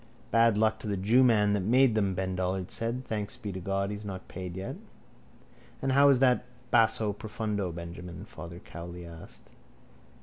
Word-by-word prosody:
—Bad 115 -1 +4
luck 110 0 +2
to - - -7
the 100 -1 -1
jewman 110 0 +4
that 105 - +2
made 125 +5 +4
them, 100 -3 +1
Ben 95 0 -2
Dollard 95 0 -2
said. 120 +3 -3
Thanks 105 0 -3
be 110 -4 -5
to 95 - -5
God 100 +2 -1
he's 105 0 -6
not 95 -2 -7
paid 90 0 -6
yet. 95 - -4 1.0
—And 135 - 0
how 140 +2 +6
is 135 - +6
that 125 -1 +3 0.3
basso 110 -2 +3
profondo, 105 -3 -3
Benjamin? 85 +1 -8
Father 85 0 -9
Cowley 85 0 -9
asked. 85 -1 -12
105 Hz, 170 wpm, -29 LUFS, 90-115 Hz, 1.0 s, how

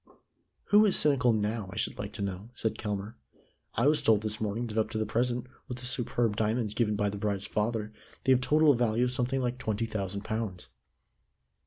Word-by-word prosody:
"Who 210 +1 +7
is 195 - +4
cynical 135 -5 +4
now, 105 -1 -1
I - - -9
should - - -2
like 100 0 -4
to 100 -1 -4
know?" 100 +2 -5
said 110 -2 -1
Kelmare. 105 +1 -4 0.6
"I 115 - +2
was 150 +1 +4
told 110 -2 +4
this 110 0 -3
morning 110 +3 -1
that 110 -1 -5
up 110 - +1
to 110 - -3
the 110 - 0
present, 120 +2 0 0.2
with 125 - -5
the 125 - -6
superb 120 -3 0
diamonds 110 0 0
given 105 -2 +1
by 105 -1 0
the 100 - -6
bride's 100 -1 -1
father, 110 0 -1 0.3
they 130 - +3
have 130 -1 +5
totalled 145 -1 +4
a - - +6
value 115 +1 +2
of 125 - +1
something 130 +1 0
like 125 0 -2
twenty 110 -1 -1
thousand 100 -2 -3
pounds." 105 -8 -4
110 Hz, 210 wpm, -29 LUFS, 105-125 Hz, 0.6 s, Who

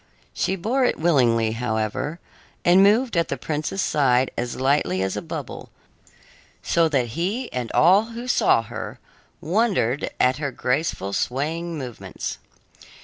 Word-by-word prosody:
She 190 - 0
bore 230 +9 0
it 250 - +1
willingly, 120 -9 +3
however, 115 +6 -2 0.5
and 180 +2 +6
moved 220 +4 +4
at 170 0 +2
the 140 - -3
prince's 155 +7 -2
side 130 -3 +2
as 120 0 -3
lightly 130 -9 +1
as 95 - -2
a - - -3
bubble, - - -7 0.9
so 165 -1 +2
that 130 -6 0
he 195 - -3
and 125 -2 -3
all 190 +6 +5
who 235 +2 -8
saw 115 - +3
her 110 0 -7 0.4
wondered 175 - +1
at 125 +1 +3
her 145 -2 -2
graceful, 125 -6 -2
swaying 160 +9 -2
movements. 125 -5 -6
145 Hz, 140 wpm, -23 LUFS, 120-180 Hz, 0.9 s, and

